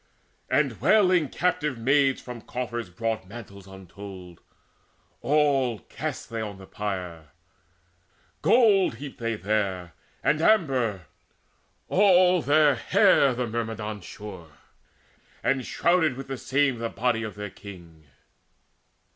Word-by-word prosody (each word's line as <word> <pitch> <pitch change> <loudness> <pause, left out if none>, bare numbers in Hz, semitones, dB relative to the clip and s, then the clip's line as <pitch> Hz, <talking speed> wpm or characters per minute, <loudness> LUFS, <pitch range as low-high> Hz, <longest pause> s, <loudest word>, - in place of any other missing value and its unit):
And 130 -4 +1
wailing 180 - +4
captive 150 -7 -1
maids 135 +3 +2
from 125 -2 -9
coffers 120 -4 -5
brought 110 +2 -3
Mantles 100 -3 -11
untold; 95 -2 -11 0.8
all 140 -5 +2
cast - - -6
they 115 -1 -3
on 105 -2 -6
the 95 - -12
pyre: 90 -6 -5 1.1
Gold 205 - +4
heaped 135 +2 -9
they 115 -1 -2
there 95 -4 -2 0.3
and 150 - +2
amber. 130 - +2 0.8
All 185 -2 +4
their 150 0 +4
hair 130 +1 +3
The 125 0 -1
Myrmidons 110 -3 -4
shore, 90 -5 -10 0.9
and 135 -2 +1
shrouded 160 -5 +1
with 135 0 -8
the 135 - -3
same 135 -3 +1
The 115 0 -2
body 120 -1 0
of 110 -2 -6
their 105 -1 -6
king. 85 -6 -13
115 Hz, 115 wpm, -26 LUFS, 100-145 Hz, 1.1 s, wailing